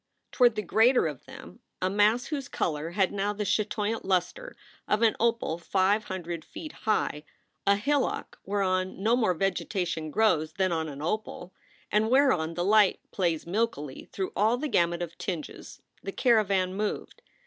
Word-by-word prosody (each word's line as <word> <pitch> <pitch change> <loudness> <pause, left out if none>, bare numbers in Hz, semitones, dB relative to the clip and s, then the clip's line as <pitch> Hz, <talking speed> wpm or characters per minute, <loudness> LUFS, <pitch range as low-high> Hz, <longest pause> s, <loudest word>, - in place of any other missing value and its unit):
Toward 245 -3 +4
the 210 - -2
greater 225 +6 +4
of 150 -5 -5
them, - - -12 0.2
a 185 - 0
mass 210 +5 +3
whose 280 -3 -4
color 155 0 -2
had 190 +2 +1
now 205 +1 -1
the 210 0 -3
chatoyant 215 +2 -1
luster 195 - -1 0.3
of 210 +2 +1
an 225 - +4
opal 230 -7 0
five 195 +4 +1
hundred 175 -3 -5
feet 310 - -9
high, 210 -8 -1 0.4
a 200 - +6
hillock 275 +6 -1
whereon 190 -1 -1
no 225 +3 +4
more 220 -8 +1
vegetation 180 -3 -2
grows 160 -4 +2
than 190 -1 0
on 160 -1 -1
an 145 0 -7
opal, 185 -1 -4 0.4
and 215 +2 +2
whereon 240 - +3
the 175 +1 -1
light 210 -1 +4
plays 170 -5 -1
milkily 170 - -3
through 190 -1 -4
all 220 +4 +3
the 305 +4 -2
gamut 170 -7 +1
of 170 -1 -8
tinges, 170 -6 -6 0.2
the 195 - -5
caravan 200 -6 +2
moved. 210 - -4
195 Hz, 160 wpm, -28 LUFS, 175-220 Hz, 0.4 s, a